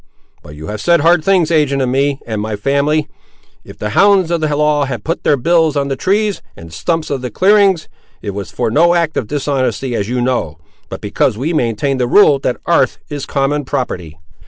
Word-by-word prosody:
But 75 - -12
you 75 +1 -9
have 105 +4 -5
said 170 -3 +3
hard 165 +1 +3
things 180 -3 +2
ag'in 140 -5 +1
me 140 +1 0
and 110 -2 -3
my 110 0 -3
family. 140 +6 0 0.6
If - - -13
the 105 - -4
hounds 195 - +3
of 170 -1 0
the 150 -2 0
law 150 -1 +2
have 120 -5 -5
put 165 - -3
their 145 - +3
bills 160 +2 +2
on 140 0 -1
the 135 - -1
trees 205 +6 0 0.2
and 80 0 -12
stumps 165 - -2
of 135 -2 -2
the 125 - -4
clearings, 195 -2 +3 0.3
it 100 - -5
was 100 -1 -6
for - - -2
no 170 +7 +4
act 165 -2 0
of 110 - -2
dishonesty 135 -2 -2
as 105 -2 -2
you 125 0 -1
know, 120 -11 -1 0.3
but - - -7
because 105 - 0
we 150 +8 -2
maintain 130 0 -1
the 125 - +1
rule 145 -2 +5
that 125 - -2
'arth 135 -7 +2
is 145 -2 -5
common 145 +1 -1
property. 90 - -4
140 Hz, 205 wpm, -15 LUFS, 125-165 Hz, 0.6 s, rule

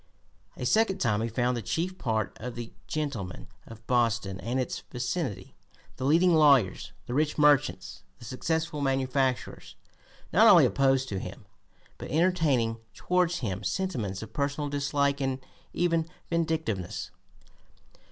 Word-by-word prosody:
A - - -4
second 220 -3 +3
time 110 - +1
he 115 - 0
found 125 +2 0
the 120 - -3
chief 180 - -3
part 110 -4 -1
of 125 +2 -6
the 120 -1 -7
gentlemen 140 - -4 0.2
of 115 0 -12
Boston 115 -6 0
and 120 +8 -2
its 130 - -2
vicinity, 125 - -3 0.4
the 130 - -3
leading 170 +4 +4
lawyers, 140 - +4
the 120 - -5
rich 150 +2 +1
merchants, 145 -1 +2 0.2
the - - -12
successful 160 +4 -2
manufacturers, 135 -1 -1 0.6
not - - +7
only - - +8
opposed 135 -1 +2
to 95 - -3
him, - - -8 0.5
but - - -7
entertaining 150 -8 +2 0.2
towards 180 -1 0
him 100 -4 -3
sentiments 105 - -2
of 110 0 -11
personal 145 +1 -2
dislike 140 0 0
and 135 -1 -1 0.3
even 165 -2 +1 0.2
vindictiveness. 160 - -2
135 Hz, 135 wpm, -28 LUFS, 115-160 Hz, 0.6 s, only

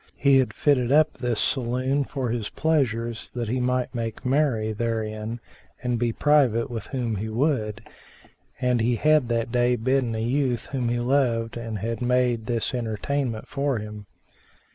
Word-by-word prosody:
He 140 -1 +5
had 130 - +1
fitted 130 -4 +2
up 155 +1 +5
this 120 -3 -2
saloon 130 +2 0
for 130 -4 -3
his 115 -3 -2
pleasures, 120 -7 0
that 120 -3 -2
he 125 +2 0
might 125 0 0
make 115 -1 -4
merry 125 -5 +1
therein 110 0 -3 0.4
and 120 -2 0
be 120 -1 +1
private 125 -4 +3
with 115 -3 -5
whom 120 -6 -2
he 110 +3 -3
would, 115 -3 -1 0.7
and 125 -2 +2
he 120 +2 +2
had 150 -1 +3
that 115 -1 0
day 125 0 +3
bidden 125 0 0
a - - -2
youth 125 -1 0
whom 125 -4 -1
he 120 0 0
loved 120 -3 +1
and 115 -2 -4
had 115 +4 -3
made 125 -2 +1
this 120 -1 -1
entertainment 120 +1 -2
for 140 -2 -1
him. 105 -1 -7
120 Hz, 165 wpm, -25 LUFS, 115-130 Hz, 0.7 s, He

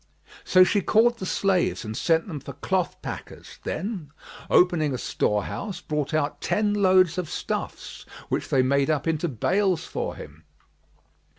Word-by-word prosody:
So 185 0 +6
she 205 +2 +2
called 230 +4 +3
the 190 - -4
slaves 190 - +1
and 110 0 -5
sent 165 - +1
them 160 -6 -5
for 140 0 -9
cloth 185 +5 -1
packers, - - -8
then, 185 -3 -4 0.4
opening 160 -6 +3
a - - -2
store 105 -3 0
house, 205 -3 -5
brought 150 -1 -3
out 155 -2 -1
ten 210 -1 +1
loads 185 -4 +4
of 180 - -4
stuffs, - - -5 0.2
which - - -2
they 130 - +3
made 140 +2 +2
up 150 -3 0
into 160 +1 0
bales 180 - 0
for 475 +1 -4
him. - - -12
175 Hz, 160 wpm, -25 LUFS, 145-195 Hz, 0.4 s, So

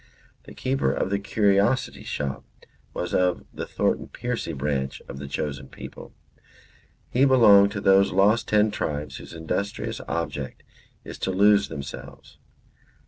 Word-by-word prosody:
The - - -12
keeper 130 - 0
of 95 - -2
the 100 - +1
curiosity 100 - +1
shop 70 -2 -4 0.5
was 90 +2 -4
of 90 -2 +1
the - - -5
Thornton - - -1
Percy 120 -8 -4
branch 70 -2 -2
of 70 - -8
the 70 - -6
chosen 70 -2 -4
people; - - -10 1.0
he 125 - +3
belonged 105 -7 +7
to 100 - -4
those 95 0 +5
Lost 105 +4 +3
Ten 105 0 +3
Tribes 75 -6 -3
whose - - -11
industrious 85 +5 -3
object 75 -5 -4 0.4
is - - -9
to - - -2
lose 100 +2 +4
themselves. 70 -1 -9
95 Hz, 140 wpm, -25 LUFS, 75-105 Hz, 1.0 s, belonged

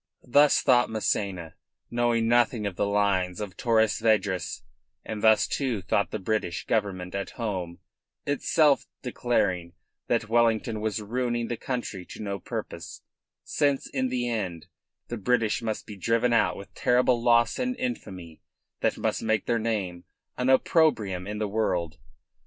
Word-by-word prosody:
Thus 145 +4 +5
thought 125 -2 +4
Massena, 100 -6 -2 0.4
knowing 120 -1 +1
nothing 120 -2 +2
of 100 -3 -3
the 100 - 0
lines 100 -3 +1
of 105 -3 -5
Torres 110 -2 +2
Vedras; 100 -6 0 0.4
and 110 -1 -5
thus, 110 0 +5
too, 125 -9 -2
thought 90 +1 +1
the - - -3
British 100 -3 -2
Government 95 -5 -1
at 100 -1 -3
home, 95 -7 -3 0.5
itself 145 +1 +2 0.2
declaring 95 -9 0 0.3
that 115 -1 0
Wellington 115 -1 +2
was 110 0 -2
ruining 120 +1 -2
the 120 - -1
country 115 -6 -4
to - - -10
no 100 -2 -4
purpose, - - -7 0.4
since 140 -2 0
in 130 -2 -1
the 125 -1 -1
end 95 -8 -3 0.4
the 120 - -3
British 115 +1 +1
must 110 -2 -3
be 105 - -9
driven 115 +4 +1
out 115 -2 +2
with 100 - -11
terrible 125 -1 +2
loss 120 -1 +3
and 255 0 -1
infamy 95 - -5 0.4
that - - 0
must - - -1
make 110 -2 0
their 120 -1 +1
name 100 -6 -2 0.3
an 125 +1 0
opprobrium 115 - +2
in 105 0 -4
the 105 0 -1
world. 90 -6 -1
110 Hz, 150 wpm, -27 LUFS, 100-120 Hz, 0.5 s, Thus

